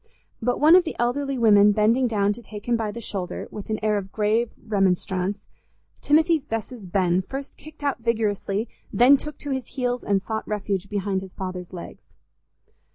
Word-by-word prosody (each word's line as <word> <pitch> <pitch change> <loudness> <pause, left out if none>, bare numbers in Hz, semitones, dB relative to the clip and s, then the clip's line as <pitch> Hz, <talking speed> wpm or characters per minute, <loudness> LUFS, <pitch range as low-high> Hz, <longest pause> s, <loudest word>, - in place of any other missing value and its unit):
But 245 +2 0
one 310 +4 +7
of 365 - +7
the 325 - -5
elderly 270 +3 0
women 210 -3 +6
bending 225 +5 +3
down 205 -3 +1
to 240 - -11
take 210 -2 -10
him 240 - +3
by 225 -2 -1
the 235 - -7
shoulder, 190 -5 -4
with 210 0 -8
an 215 - 0
air 210 -1 +2
of 195 -1 -9
grave 220 +2 +1
remonstrance, 195 -1 0 0.6
Timothy's 315 0 +3
Bess's 225 -1 -5
Ben 180 -1 +1
first 270 +8 -7
kicked 310 0 -14
out 280 -3 0
vigorously, 220 -2 -1 0.2
then 250 +4 +6
took 300 +1 -6
to 290 - -6
his 265 -3 -2
heels 250 -2 -1
and 195 -1 +1
sought 220 +3 -4
refuge 195 -2 -2
behind 200 -2 -1
his 190 -1 -11
father's 185 -2 -5
legs. 175 -2 -10
215 Hz, 180 wpm, -24 LUFS, 200-250 Hz, 0.6 s, one